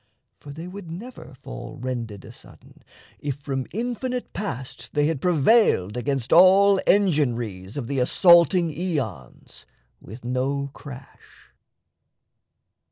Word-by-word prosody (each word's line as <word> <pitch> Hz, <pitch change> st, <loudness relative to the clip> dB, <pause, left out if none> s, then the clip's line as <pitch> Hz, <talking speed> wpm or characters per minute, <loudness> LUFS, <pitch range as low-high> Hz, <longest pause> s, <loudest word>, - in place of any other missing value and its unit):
for 145 Hz, -, -11 dB
they 160 Hz, +4 st, -8 dB
would 185 Hz, -1 st, -9 dB
never 185 Hz, -, -9 dB
fall -, -, -8 dB
Rended 120 Hz, -5 st, -5 dB
asudden, -, -, -16 dB, 0.4 s
if 145 Hz, -2 st, -3 dB
from 135 Hz, -3 st, -4 dB
infinite 245 Hz, +4 st, -4 dB
Past 135 Hz, -, -6 dB
They 145 Hz, -1 st, +2 dB
had 155 Hz, -3 st, -1 dB
prevailed 165 Hz, -, +3 dB
against 130 Hz, 0 st, -1 dB
all 190 Hz, +3 st, +6 dB
engin'ries 120 Hz, -, +1 dB
Of 135 Hz, -, -3 dB
the 135 Hz, +2 st, -2 dB
assaulting 170 Hz, +5 st, +5 dB
aeons, 140 Hz, -, -5 dB, 0.3 s
with 115 Hz, +6 st, -12 dB
no 135 Hz, +3 st, -2 dB
crash. 140 Hz, -2 st, -14 dB
145 Hz, 110 wpm, -24 LUFS, 125-180 Hz, 0.4 s, all